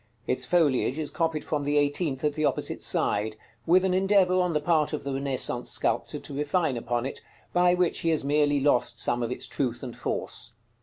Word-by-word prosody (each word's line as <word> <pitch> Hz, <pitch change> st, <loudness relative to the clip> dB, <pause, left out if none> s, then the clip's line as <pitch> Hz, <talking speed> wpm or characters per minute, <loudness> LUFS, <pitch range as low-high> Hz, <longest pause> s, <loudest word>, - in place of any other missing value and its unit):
Its 130 Hz, -, 0 dB
foliage 150 Hz, -6 st, +2 dB
is 155 Hz, -2 st, -3 dB
copied 165 Hz, -3 st, -1 dB
from 150 Hz, -2 st, -2 dB
the 145 Hz, +1 st, +1 dB
eighteenth 145 Hz, -1 st, 0 dB
at 150 Hz, -1 st, +1 dB
the 155 Hz, +1 st, -2 dB
opposite -, -, -1 dB
side, 105 Hz, +1 st, 0 dB, 0.3 s
with 185 Hz, +3 st, +5 dB
an 185 Hz, -, +1 dB
endeavor 190 Hz, -1 st, +3 dB
on 180 Hz, -2 st, +2 dB
the 150 Hz, -, +2 dB
part 155 Hz, -1 st, +1 dB
of 150 Hz, -, -3 dB
the 140 Hz, 0 st, -3 dB
Renaissance 135 Hz, -3 st, -2 dB
sculptor -, -, 0 dB
to -, -, -9 dB
refine 150 Hz, 0 st, 0 dB
upon 120 Hz, +1 st, -2 dB
it, 135 Hz, -, -5 dB, 0.3 s
by 180 Hz, 0 st, +4 dB
which 180 Hz, -1 st, +1 dB
he 165 Hz, -, 0 dB
has 160 Hz, -3 st, +1 dB
merely 145 Hz, 0 st, +2 dB
lost 130 Hz, -3 st, +1 dB
some 120 Hz, 0 st, 0 dB
of 115 Hz, -, -1 dB
its -, -, -3 dB
truth 125 Hz, -3 st, -3 dB
and 125 Hz, -2 st, -6 dB
force. -, -, -4 dB
150 Hz, 205 wpm, -27 LUFS, 135-170 Hz, 0.3 s, with